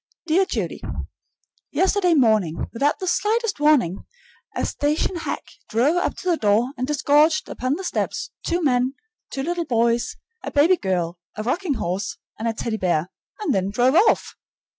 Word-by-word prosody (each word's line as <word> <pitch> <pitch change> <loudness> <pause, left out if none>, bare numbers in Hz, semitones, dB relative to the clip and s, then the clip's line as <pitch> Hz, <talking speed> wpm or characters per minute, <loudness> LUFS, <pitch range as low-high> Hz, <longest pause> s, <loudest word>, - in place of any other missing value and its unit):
Dear 355 +4 +3
Judy: - - -3 0.9
Yesterday 375 -2 +2
morning, 215 - +2
without 280 +5 +1
the 375 - -5
slightest 425 +2 0
warning, 280 - +3 0.5
a - - 0
station 300 +5 0
hack 330 - -4 0.3
drove 255 +9 +2
up 355 - 0
to 365 - -3
the 335 - +2
door 220 +3 +2
and 255 - -3
disgorged 300 +2 +3
upon 255 +3 -2
the 380 - -6
steps - - -2
two 345 0 -1
men, 255 -1 +2 0.3
two 270 - -4
little 345 +2 -1
boys, 235 -1 +1 0.3
a - - -3
baby 320 +6 +4
girl, 180 - -2 0.2
a 215 - -3
rocking 300 - -1
horse, 185 -1 -3 0.2
and 225 - -2
a 225 - 0
Teddy 220 0 -3
bear, 175 -2 0 0.3
and 345 -10 +1
then 190 0 0
drove 245 +5 +2
off! 390 +8 +3
270 Hz, 160 wpm, -23 LUFS, 220-340 Hz, 0.9 s, baby